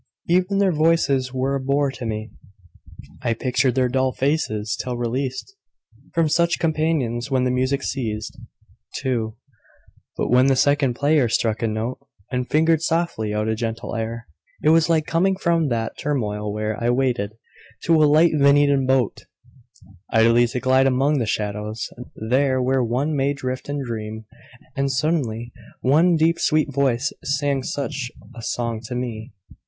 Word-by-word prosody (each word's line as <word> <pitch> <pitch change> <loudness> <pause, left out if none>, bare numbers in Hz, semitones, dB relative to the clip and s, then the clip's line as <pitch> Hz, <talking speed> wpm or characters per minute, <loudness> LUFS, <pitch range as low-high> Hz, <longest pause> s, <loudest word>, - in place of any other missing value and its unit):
Even 185 +3 +2
their 195 -1 +3
voices 150 -5 +2
were 130 +1 -1
a 140 - 0
bore 140 +1 +1
to 125 -3 -6
me; 110 0 -4 0.9
I 115 -2 0
pictured 130 +1 0
their 130 -1 +3
dull 130 +1 +1
faces, 110 -7 -1
till 125 -1 -4
released 130 - -3 0.6
From 165 -1 +3
such 170 +3 +2
companions, 155 -7 0
when 130 -2 +1
the 125 - +1
music 130 +2 0
ceased. 110 -5 -3 0.7
II. 115 -4 -1 0.8
But - - -1
when 125 +2 +5
the 135 - +4
second 140 -2 +2
player 145 -2 +2
struck 110 0 0
a 115 - +1
note 110 +3 -3 0.3
And 125 0 -2
fingered 160 +1 +3
softly 165 -10 -1
out 105 +1 -1
a 110 - +1
gentle 115 0 -4
air 115 +1 -4 0.4
It 150 - +4
was 165 +1 +4
like 160 -2 +2
coming 185 +4 +1
from 170 -4 +1
that 115 -3 -2
turmoil 105 -8 -2
where 105 +2 -3
I 120 - +2
waited, 120 -5 0 0.5
to 165 -2 +4
a - - +7
light 160 +3 +5
Venetian 140 -2 +4
boat, 130 -4 +1 0.9
Idly 115 +2 +4
to 120 +2 -3
glide 130 +1 +3
among 135 +3 +2
the 115 - -1
shadows, 105 +1 -3 0.3
there 130 +4 +1
Where 130 0 +1
one 130 +6 -1
may 140 0 +1
drift 130 -1 -5
and 145 -1 -3
dream; 110 -1 -5 0.5
and 135 0 0
suddenly 130 -6 -1 0.3
One 160 +7 +4
deep 165 +1 +2
sweet 155 -2 +1
voice 135 -1 +1
sang 140 0 0
such 135 -1 -4 0.3
a 115 - -8
song 115 -1 -3
to 125 - -5
me. 115 -3 -5
130 Hz, 160 wpm, -22 LUFS, 115-145 Hz, 0.9 s, a